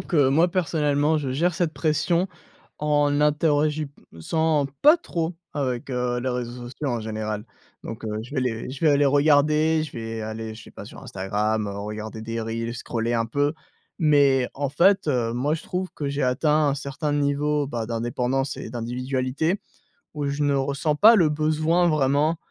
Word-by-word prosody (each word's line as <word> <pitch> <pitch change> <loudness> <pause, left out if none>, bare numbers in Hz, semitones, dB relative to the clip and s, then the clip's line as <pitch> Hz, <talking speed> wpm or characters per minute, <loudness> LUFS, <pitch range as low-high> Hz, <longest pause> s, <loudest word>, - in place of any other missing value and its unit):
que 145 -7 +2
moi, 160 +6 +4
personnellement, 150 -3 +1
je 135 -3 -3
gère 170 +7 +1
cette 165 -1 -1
pression 160 +3 +1 0.5
en 145 -1 +2
n'interagissant 150 - 0
pas 300 +4 +7
trop 170 - -3 0.2
avec, 130 -3 -3
heu, 125 -1 -1
les 130 - -2
réseaux 125 0 -4
sociaux 145 +1 -4
en 120 -2 -1
général 110 -1 -4 0.4
donc 115 0 -7
heu, - - -3
je 120 - -12
vais 130 - +1
les 120 -2 -2
je 130 - -8
vais 155 - +6
aller 145 0 +3
regarder, 150 +2 +3
je 155 - -8
vais 115 -1 -5
aller, 110 0 -5
je 110 - -12
sais - - -14
pas, - - -10
sur - - -12
Instagram, 105 +3 -1
regarder 105 +2 -6
des 115 +1 -4
reels, 115 +1 -3
scroller 115 0 -2
un 115 -1 +1
peu, 145 +5 0 0.5
mais 140 -5 +4
en 140 0 -2
fait, 190 +6 +3
heu, 120 -4 +1
moi 140 +5 0
je 165 - -6
trouve 185 +1 -3
que 145 - -3
j'ai 140 +1 -2
atteint 150 +4 +2
un 140 - +1
certain 145 +2 -3
niveau, 145 0 +1
bah, 120 -4 -3
d'indépendance 125 +4 -1
et - - -7
d'individualité 130 - -2 0.5
où 145 -1 -2
je 140 +1 -2
ne 145 - +2
ressens 140 +2 0
pas 220 +9 +7
le 170 -6 +4
besoin 155 +3 +2
vraiment 150 +1 +2
140 Hz, 175 wpm, -24 LUFS, 120-155 Hz, 0.5 s, pas